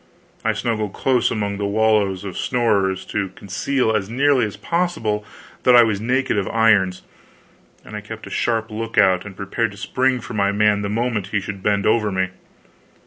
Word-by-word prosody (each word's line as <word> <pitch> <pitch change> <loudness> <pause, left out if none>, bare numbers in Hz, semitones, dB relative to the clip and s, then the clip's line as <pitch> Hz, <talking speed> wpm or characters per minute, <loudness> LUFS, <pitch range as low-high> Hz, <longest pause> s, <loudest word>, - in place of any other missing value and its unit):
I - - +1
snuggled 110 -4 -2
close 125 -2 +1
among 100 -2 -2
the 100 - -1
wallow 110 0 +3
of 95 -1 -7
snorers, 100 -6 0
to 100 -2 -2
conceal 110 +5 -1
as 100 -1 -1
nearly 135 0 +3
as 105 - -9
possible 115 - -1 0.4
that 125 - +5
I 120 - +9
was 105 -3 -1
naked 125 -1 +1
of 95 - -3
irons; 105 -5 +2 0.8
and 105 - -9
I 105 - -5
kept 110 +1 -9
a - - -10
sharp 110 -1 -1
lookout 105 -4 +2
and 95 -2 -11
prepared 105 +3 -1
to - - -13
spring 130 +4 0
for 120 - -9
my 100 -2 +1
man 105 0 +2
the 100 - -3
moment 115 -2 -1
he 100 - -1
should 100 0 -7
bend 100 0 +1
over 110 -1 +2
me. 95 -1 0
105 Hz, 185 wpm, -21 LUFS, 100-115 Hz, 0.8 s, I